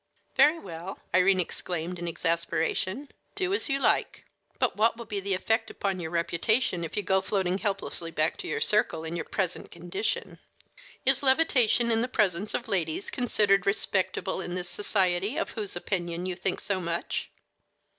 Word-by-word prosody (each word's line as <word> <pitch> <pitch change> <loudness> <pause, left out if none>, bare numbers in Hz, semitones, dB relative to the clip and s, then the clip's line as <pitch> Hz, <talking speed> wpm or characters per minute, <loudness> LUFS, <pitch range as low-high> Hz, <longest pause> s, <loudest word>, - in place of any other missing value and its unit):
"Very 310 +3 +6
well," 175 - -7 0.2
Irene 185 +1 +5
exclaimed 175 0 -3
in 175 - -4
exasperation; 170 - -1 0.3
"do 375 -1 0
as 405 - 0
you 275 - +2
like! 275 - +1 0.3
But - - +1
what 225 +2 +3
will 235 - -7
be 210 -2 -3
the 195 0 0
effect 225 +4 0
upon 195 -2 -2
your 160 -2 -4
reputation 170 +4 +1
if 165 - -6
you 205 - +1
go 190 +2 +2
floating 190 -1 0
helplessly 195 -5 -2
back 155 -1 +1
to - - -6
your - - -2
circle 210 -6 +2
in 165 +1 -4
your 170 - -3
present 185 -3 -2
condition? 175 +5 -3 0.7
Is - - +5
levitation 260 -5 +4
in 225 0 +3
the 245 - +1
presence 210 -5 +1
of - - -3
ladies 170 -1 -1
considered 205 -6 +2
respectable 190 -1 0
in 175 -1 -4
this 180 -1 -4
society 195 - +1
of 330 - -1
whose 210 -5 -4
opinion 175 -1 -2
you 185 -1 -2
think 185 +1 -2
so 195 -2 -1
much?" 170 0 -2
190 Hz, 170 wpm, -28 LUFS, 175-215 Hz, 0.7 s, Very